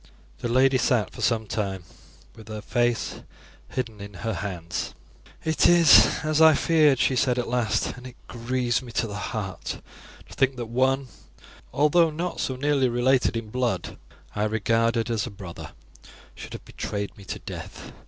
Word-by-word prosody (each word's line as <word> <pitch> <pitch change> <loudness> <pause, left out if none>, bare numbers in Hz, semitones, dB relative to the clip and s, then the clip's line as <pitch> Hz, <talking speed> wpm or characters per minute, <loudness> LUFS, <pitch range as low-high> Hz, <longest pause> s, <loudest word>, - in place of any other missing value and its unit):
The - - -3
lady 130 +2 +3
sat 120 -4 +1
for - - -9
some 110 0 +1
time 100 -3 -3 0.5
with 110 -1 -14
her 110 -1 -6
face 120 0 -1 0.5
hidden 115 -5 -4
in 100 -1 -9
her 115 - 0
hands. 85 -3 -4 0.5
"It 160 -1 +3
is 160 -10 +7
as 155 0 +1
I 160 -1 +8
feared," 155 -4 +4
she 130 - +2
said 125 0 +2
at 125 - -1
last, 115 -3 0
"and 125 +1 -10
it 125 - -12
grieves 120 +1 -1
me 125 -2 -10
to - - 0
the 105 - -6 0.2
heart 100 -5 -5 0.5
to - - -13
think 135 -1 +1
that 120 -1 -4
one 130 +3 +2
who, - - -18 0.6
although 160 +3 +4
not 170 +3 -4
so 130 - -1
nearly 140 -1 +1
related 125 0 +2
in 110 -2 -6
blood, 120 -7 -2 0.4
I 105 - 0
regarded 115 +2 +1
as 115 +1 -1
a - - -5
brother, 95 -4 -9 0.6
should - - -10
have - - -9
betrayed 100 -1 -5
me 100 - -13
to - - -5
death. - - -9
120 Hz, 175 wpm, -25 LUFS, 110-130 Hz, 0.6 s, I